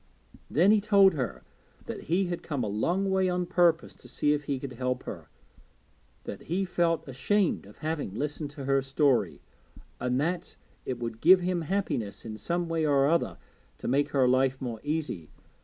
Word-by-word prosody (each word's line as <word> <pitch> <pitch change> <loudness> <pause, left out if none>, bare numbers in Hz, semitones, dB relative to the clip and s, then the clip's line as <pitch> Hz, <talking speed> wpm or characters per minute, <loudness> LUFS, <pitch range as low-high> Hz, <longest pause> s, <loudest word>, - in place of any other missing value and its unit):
Then 180 +7 +4
he 215 -1 +4
told 200 -2 +5
her 130 -7 -3 0.4
that - - -6
he 180 +4 +1
had 175 -1 -3
come 145 -6 -3
a - - -1
long 175 - 0
way 190 -1 +2
on 180 0 0
purpose 175 -2 +2
to - - -15
see 150 0 +1
if 145 -1 -3
he 140 -1 -1
could 130 -1 -6
help 125 +1 -2
her; - - -8 0.9
that - - -8
he 190 +3 0
felt 170 -3 0
ashamed 150 - 0
of 105 - -15
having 155 -10 -3
listened 150 +3 -3
to 140 - -5
her 135 0 +3
story, 135 -1 +1 0.6
and 125 +1 0
that 170 +4 -2 0.3
it 130 - -2
would 115 -2 -5
give 180 +3 +7
him 180 -1 0
happiness 160 - -2
in 110 -1 -5
some 170 +9 -2
way 165 -1 0
or 140 -2 +3
other 170 +3 +1 0.4
to - - -6
make 140 +3 +2
her 135 -3 +3
life 130 +1 +2
more 120 -4 -4
easy. 145 - -3
150 Hz, 185 wpm, -28 LUFS, 130-175 Hz, 0.9 s, give